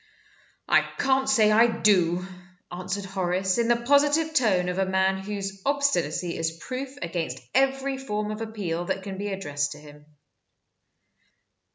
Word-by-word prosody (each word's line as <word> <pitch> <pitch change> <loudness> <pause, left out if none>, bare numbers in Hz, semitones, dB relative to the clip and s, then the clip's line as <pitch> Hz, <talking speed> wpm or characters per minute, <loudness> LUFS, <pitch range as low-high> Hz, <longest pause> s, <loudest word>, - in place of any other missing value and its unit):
"I - - +5
can't 265 0 0
say 220 -5 +4
I 225 +3 +6
do," 180 -6 +2 0.5
answered 185 +3 -4
Horace, 190 +1 0
in 235 - +2
the 240 - +4
positive 290 +4 +3
tone 195 - +2
of 180 +1 -2
a 190 - +2
man 190 0 +1
whose 195 -1 -5
obstinacy 180 - 0
is 165 0 -2
proof 260 +7 -6
against 170 -1 -3 0.2
every 270 0 +1
form 210 -5 -3
of 215 +1 -6
appeal 195 -7 -3
that 190 - -3
can 195 -1 -6
be 205 - -3
addressed 145 -7 -2
to - - -13
him. 150 0 -15
195 Hz, 150 wpm, -26 LUFS, 180-245 Hz, 0.5 s, I